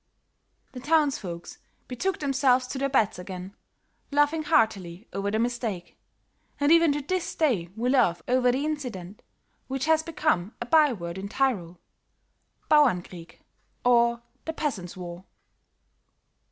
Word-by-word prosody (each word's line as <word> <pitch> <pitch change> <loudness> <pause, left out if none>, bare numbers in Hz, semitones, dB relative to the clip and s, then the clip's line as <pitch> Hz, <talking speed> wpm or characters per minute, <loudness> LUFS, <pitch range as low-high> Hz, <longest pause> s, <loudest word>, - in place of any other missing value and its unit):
"The 255 - -8
townsfolks 275 - -1 0.3
betook 335 +10 -2
themselves 265 -3 +2
to 265 - -4
their 275 0 0
beds 225 -9 +1
again, 185 0 -7 0.6
laughing 290 +2 +2
heartily 220 - 0
over 195 +1 -2
the 215 - 0
mistake; 230 -6 -3 0.6
and 285 +1 +3
even 335 -2 +6
to 290 0 -3
this 370 +4 -2
day 230 - +1
we 235 +2 -2
laugh 175 -11 +2
over 250 0 +3
the 270 +4 -1
incident 240 - -5 0.5
which 265 -1 -2
has 320 0 +3
become 310 - -1
a - - -4
by 300 +2 +5
word 170 -4 -5
in 200 +1 -6
Tyrol; 195 -10 -1 0.9
Bauernkrieg, 180 - +1 0.4
or 235 -1 +3 0.2
the 320 - -3
peasant's 220 - -4
war." 175 0 -8
245 Hz, 130 wpm, -26 LUFS, 185-290 Hz, 0.9 s, even